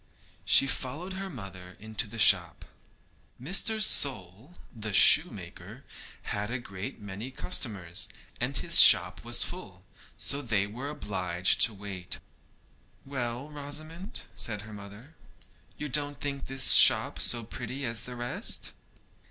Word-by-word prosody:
She - - +6
followed 145 +8 -4
her 190 +1 -6
mother 95 - -11
into 110 +1 -2
the 115 +3 -10
shop. 90 -5 +3 0.7
Mr. 195 - 0
Sole, 130 - +4 0.2
the 110 -2 -6
shoemaker, - - +3 0.4
had 105 +1 -4
a 130 - -3
great 100 -5 -8
many 105 +4 -8
customers, 95 -8 -2 0.3
and - - -3
his - - +4
shop - - +5
was - - +3
full, - - -8 0.3
so 140 - -1
they 110 -6 -1
were 120 +7 -7
obliged 95 -9 -1
to 115 - -7
wait. 95 -3 -5 0.9
'Well, 130 +1 -5
Rosamond,' 155 +7 -8
said 105 -3 -6
her 105 0 -12
mother, 105 +8 -13 0.6
'you 150 - -5
don't 145 +1 -1
think 140 -1 -5
this 135 -1 +2
shop - - +5
so 120 -1 0
pretty 130 +4 -7
as 115 -3 -3
the 125 - -9
rest?' 120 0 -7
120 Hz, 130 wpm, -28 LUFS, 100-140 Hz, 0.9 s, She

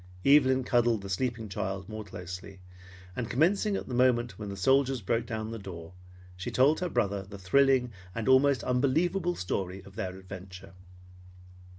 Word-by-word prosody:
Evelyn 130 -2 +5
cuddled 120 -4 +2
the 100 - -6
sleeping 115 +2 -2
child 95 -1 -4
more 110 0 -6
closely, 95 0 -8 0.6
and 120 -2 -3
commencing 195 - +2
at - - -4
the 125 - -6
moment 120 -2 +2
when 105 -2 -5
the 100 - -6
soldiers 135 +5 +3
broke 115 +3 -1
down 110 -1 -4
the 115 - -5
door, 90 -3 -9 0.4
she 95 - -5
told 140 +5 +3
her 180 - -2
brother 100 -7 0
the 100 +1 -10
thrilling 125 +5 +3 0.2
and 115 0 -3
almost 130 -1 +4
unbelievable 165 +8 +1
story 95 +1 -3
of 100 0 -15
their 95 -4 -4
adventure. 95 0 -10
115 Hz, 165 wpm, -29 LUFS, 95-130 Hz, 0.6 s, Evelyn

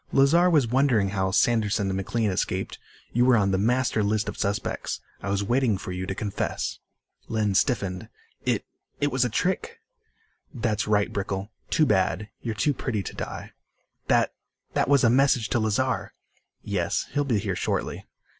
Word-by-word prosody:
"Lazar 165 +7 +5
was 150 -7 +4
wondering 120 -4 +2
how 95 -1 0
Sanderson 105 0 +2
and 95 - -1
McLean 105 +2 0
escaped. 90 - -2 0.3
You 120 - +3
were 125 -1 +5
on 100 -2 +2
the 95 - +1
master 120 +1 +2
list 105 +1 0
of - - -4
suspects. 100 0 -2 0.2
I 100 - -4
was 100 0 0
waiting 120 -1 +2
for 95 - -6
you 90 0 -4
to 95 - -3
confess." 100 -1 -3 0.5
Lynn 110 -3 0
stiffened. 95 -4 0 0.3
"It - - 0 0.3
it 145 0 +1
was 130 0 +2
a 125 - +1
trick." 185 - -1 0.7
"That's 115 -6 -1
right, 105 -1 +2
Brickel. 100 +1 -3 0.2
Too 155 - +3
bad. 100 -1 +1
You're 115 -2 -3
too 145 +7 +1
pretty 115 -6 -2
to - - -6
die." - - -6 0.6
"That - - +3 0.4
that - - +1
was 140 -1 +5
a 115 - +6
message 130 -3 +3
to 120 - +1
Lazar." 110 +4 0 0.5
"Yes. 95 -4 -1
He'll 145 - +2
be 125 -6 +1
here 100 -2 -2
shortly." - - -2
110 Hz, 170 wpm, -26 LUFS, 100-130 Hz, 0.7 s, a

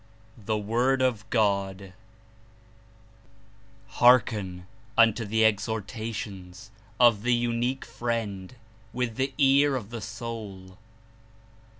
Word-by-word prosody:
THE 110 0 0
WORD 120 +6 +1
OF 115 -4 -1
GOD 100 -4 0 1.9
"Hearken 105 -7 +3 0.3
unto 115 0 +4
the 110 +2 +2
exhortations 105 -2 -3 0.3
of 120 -4 +5
the 120 +1 +2
Unique 120 +2 -1
Friend 115 -3 -4 0.4
with 125 -3 -3
the 135 +1 0
ear 140 0 +4
of 115 -4 -5
the 115 -2 -6
soul. 105 -4 -8
110 Hz, 90 wpm, -26 LUFS, 100-120 Hz, 1.9 s, of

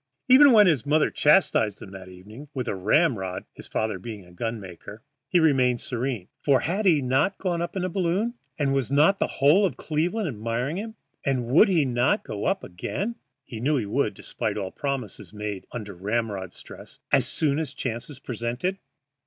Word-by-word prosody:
And 255 - +5
even 280 +1 +9
when 215 -3 +7
his 155 - +3
mother 150 +2 +2
chastised 145 - +3
him 95 - -10
that 95 -1 -10
evening 105 +10 -12
with 130 -2 -3
a - - -1
ram 110 - +2
rod 95 -1 -5
(his - - -12
father 110 -3 -2
being 105 -1 -8
a 90 - -17
gun 115 +5 -4
maker) 100 +4 -11 0.3
he 180 - +4
remained 130 -6 +3
serene, 120 -6 -3
for 140 -3 +3
had 195 +5 0
he 155 -6 +4
not 135 +10 +1
gone 175 -3 -1
up 175 - -4
in 190 - -1
a - - 0
balloon, 190 +5 0 0.2
and 140 -2 +1
was 135 -2 0
not 155 +8 +4
the - - +1
whole 150 +9 +4
of 190 - 0
Cleveland 175 +7 -1
admiring 120 +5 -2
him, 220 +2 -6 0.3
and 130 -3 0
would 140 - +5
he 165 -6 +3
not 130 - +1
go 105 -1 -5
up 195 +1 0
again 195 - -4 0.3
(he 115 -4 -8
knew 145 +5 +1
he 115 - -1
would, 100 - 0
despite - - -4
all 95 -2 -3
promises 135 -8 -5
made 105 -2 -5
under 105 -4 -6
ram 105 +5 -1
rod 95 -2 -6
stress) - - -12
as - - +3
soon 150 -1 0
as 155 -4 -3
the 140 - -19
chance 125 +2 -4
presented? 125 - -3
130 Hz, 200 wpm, -25 LUFS, 110-170 Hz, 0.3 s, even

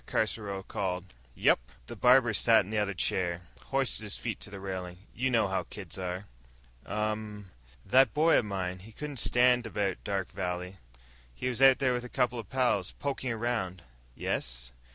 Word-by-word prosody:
Caruso 105 -3 -1
called. 95 -3 -3 0.2
"Yep." - - +4 0.3
The - - -8
barber 125 -2 +5
sat 110 -1 +5
in 100 - -9
the 110 - +1
other 100 -1 -1
chair, 90 -1 0 0.2
hoisted 135 -4 +1
his 105 -2 -2
feet 115 -3 -4
to - - -5
the 100 0 -8
railing. 95 -2 -5 0.2
"You 130 +2 0
know 115 -4 +3
how 95 0 -2
kids 95 -3 -7
are." 90 +1 -3 0.6
"Um." 105 -2 -3 0.3
"That 130 +6 +5
boy 160 +2 +4
of - - -2
mine, 95 -2 -3
he 110 +5 -13
couldn't 145 +3 -6
stand 125 0 +3
it - - -7
about 100 -3 -1
Dark 100 -2 -2
Valley. 90 +1 -4 0.6
He 125 - -2
was 125 +1 -3
out 135 -1 +8
there 130 -2 +2
with 120 0 -2
a 125 - -8
couple 125 0 0
of 110 - -8
pals, 120 -8 +1
poking 135 -3 -3
around." 110 -6 -2 0.3
"Yes?" - - -3
105 Hz, 180 wpm, -30 LUFS, 95-125 Hz, 0.6 s, out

